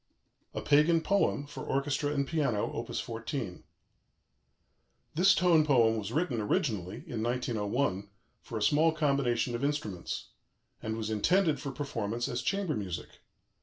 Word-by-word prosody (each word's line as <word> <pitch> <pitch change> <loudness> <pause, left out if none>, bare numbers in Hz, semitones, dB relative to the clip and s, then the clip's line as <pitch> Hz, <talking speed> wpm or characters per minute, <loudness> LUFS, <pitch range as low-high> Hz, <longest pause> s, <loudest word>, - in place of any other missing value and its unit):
"A - - -2
PAGAN 155 +3 +4
POEM," 200 -6 +1
FOR 145 - -8
ORCHESTRA 140 +1 0
AND 140 -1 +1
PIANO: 140 -10 0
Op. - - -4
14 115 -3 -4 1.5
This 185 +5 +5
tone 170 -3 +5
poem 120 -6 +4
was 105 0 -4
written 135 -5 0
originally 105 - -1
(in 110 - -4
1901) 115 -3 -1 0.3
for 115 - -6
a 105 - -1
small 155 +8 +4
combination 135 -6 +1
of 120 +3 -3
instruments, 140 - -3 0.5
and 110 0 -3
was 110 -1 -3
intended 160 - +2
for 140 0 -4
performance 120 -4 -3
as 120 - -2
chamber 195 -5 0
music. 95 -5 -5
130 Hz, 135 wpm, -30 LUFS, 110-150 Hz, 1.5 s, This